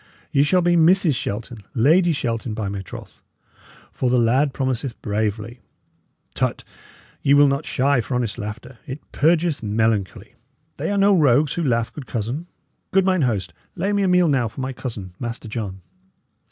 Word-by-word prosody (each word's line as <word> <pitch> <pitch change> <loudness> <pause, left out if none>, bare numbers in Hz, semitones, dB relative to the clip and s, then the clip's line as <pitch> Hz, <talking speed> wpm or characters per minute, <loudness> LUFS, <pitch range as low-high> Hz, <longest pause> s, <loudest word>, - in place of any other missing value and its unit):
Ye 140 - +3
shall 180 +6 +3
be 175 0 +3
Mrs. 170 0 +4
Shelton 115 0 -4 0.2
Lady 165 +9 +4
Shelton, 115 -5 -2
by 105 -2 -3
my 100 -1 -4
troth! 95 - -11 0.7
for 125 - -1
the 125 - +3
lad 130 +5 +3
promiseth 130 -2 -3
bravely. 110 +2 -2 0.7
Tut! - - -1 0.6
ye 140 - +4
will 145 0 +6
not 140 +2 -1
shy 135 -1 +2
for 125 - -4
honest 120 -2 -2
laughter; 115 +4 -7
it 135 +2 -5
purgeth 165 0 +2
melancholy. 110 -1 -1 0.4
They - - -2
are 205 - 0
no 200 0 +5
rogues 145 -2 +3
who 170 - -2
laugh, 115 -5 0
good 140 -4 -9
cousin. 120 +10 -3 0.4
Good 195 -1 +3
mine 185 -3 +2
host, 100 -9 -1 0.2
lay 195 +4 -1
me 205 - +1
a 195 - +2
meal 180 -1 +4
now 130 -6 +2
for 110 - -8
my 130 0 -3
cousin, 105 -8 -6
Master 115 -1 -5
John. 105 -4 -5
125 Hz, 170 wpm, -22 LUFS, 110-155 Hz, 0.7 s, will